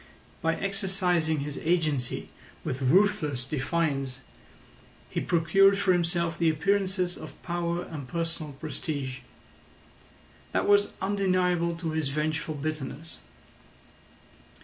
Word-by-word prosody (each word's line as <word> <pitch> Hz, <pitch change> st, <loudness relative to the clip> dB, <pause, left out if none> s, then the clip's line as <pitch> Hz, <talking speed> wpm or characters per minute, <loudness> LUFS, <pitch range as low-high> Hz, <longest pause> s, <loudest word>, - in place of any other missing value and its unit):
By 165 Hz, 0 st, +2 dB
exercising 185 Hz, -6 st, 0 dB
his 145 Hz, 0 st, -4 dB
agency 155 Hz, -7 st, 0 dB, 0.3 s
with 130 Hz, +1 st, -3 dB
ruthless 150 Hz, -3 st, +3 dB
defiance 140 Hz, -2 st, -1 dB, 0.9 s
he -, -, -1 dB
procured 195 Hz, +4 st, +4 dB
for 195 Hz, -2 st, +3 dB
himself 170 Hz, -1 st, 0 dB
the 165 Hz, -1 st, +4 dB
appearances 185 Hz, +2 st, +1 dB
of 155 Hz, -, -10 dB
power 175 Hz, 0 st, -1 dB
and 145 Hz, -5 st, -7 dB
personal 165 Hz, -1 st, -3 dB
prestige. 140 Hz, -2 st, -4 dB, 1.3 s
That -, -, +1 dB
was 205 Hz, 0 st, +4 dB
undeniable 185 Hz, -3 st, +2 dB
to 165 Hz, -1 st, -3 dB
his 155 Hz, -2 st, 0 dB
vengeful 150 Hz, +1 st, -1 dB
bitterness. 155 Hz, +1 st, -5 dB
165 Hz, 105 wpm, -28 LUFS, 150-180 Hz, 1.3 s, procured